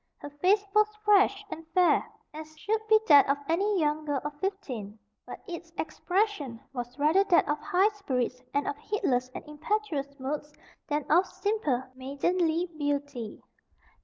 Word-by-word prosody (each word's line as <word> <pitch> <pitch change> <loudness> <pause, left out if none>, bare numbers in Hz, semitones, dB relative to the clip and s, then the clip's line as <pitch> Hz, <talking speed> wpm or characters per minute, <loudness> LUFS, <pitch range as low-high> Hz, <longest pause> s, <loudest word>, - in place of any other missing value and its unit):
Her 290 - -9
face 380 +8 +2
was 425 0 +5 0.2
fresh 405 0 +4
and 325 - -6
fair, 360 -1 +4 0.3
as 310 0 -10
should 435 +7 -1
be 435 0 +6
that 285 -3 +7
of 280 - +3
any 390 +4 +1
young 305 0 +1
girl 290 -2 -1
of 295 - -3
fifteen, 255 - -4 0.3
but - - -9
its 340 -1 -7
expression 320 - -1
was 245 0 -6
rather 310 +7 +4
that 360 -4 +4
of 295 0 0
high 385 +4 +3
spirits 255 - -2
and 285 +1 0
of - - -1
heedless 255 -12 -1
and - - -7
impetuous 300 -3 -3
moods 295 +3 -4 0.4
than 295 -1 -1
of 355 +4 +5
simple 390 - -1
maidenly 320 +6 0
beauty. 285 -6 -3
310 Hz, 155 wpm, -28 LUFS, 280-390 Hz, 0.4 s, that